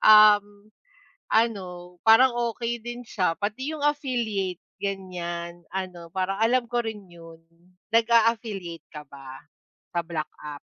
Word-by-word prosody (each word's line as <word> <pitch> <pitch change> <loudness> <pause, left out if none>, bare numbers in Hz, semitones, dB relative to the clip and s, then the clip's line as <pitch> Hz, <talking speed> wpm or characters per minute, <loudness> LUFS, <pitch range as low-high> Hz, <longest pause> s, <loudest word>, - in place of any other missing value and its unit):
Um, 210 -1 +6 0.6
ano, 180 -6 0
parang 245 +4 +8 0.2
okey 235 0 -2
din 240 +1 -6
siya, 185 -7 0
pati 260 +9 -2
yung 295 - -6
affiliate, 235 - -1 0.2
ganyan, 175 -3 -5
ano, 180 -3 -4
parang 190 +1 -1
alam 240 +2 +3
ko 240 0 +1
rin 215 -2 -5
'yon. 165 -1 -13 0.5
Nag-a-affiliate 225 -7 +2
ka 150 - -6
ba 135 -1 -11 0.5
sa 175 - 0
black 160 -3 -3
app? 150 -1 -7
200 Hz, 125 wpm, -26 LUFS, 175-230 Hz, 0.6 s, parang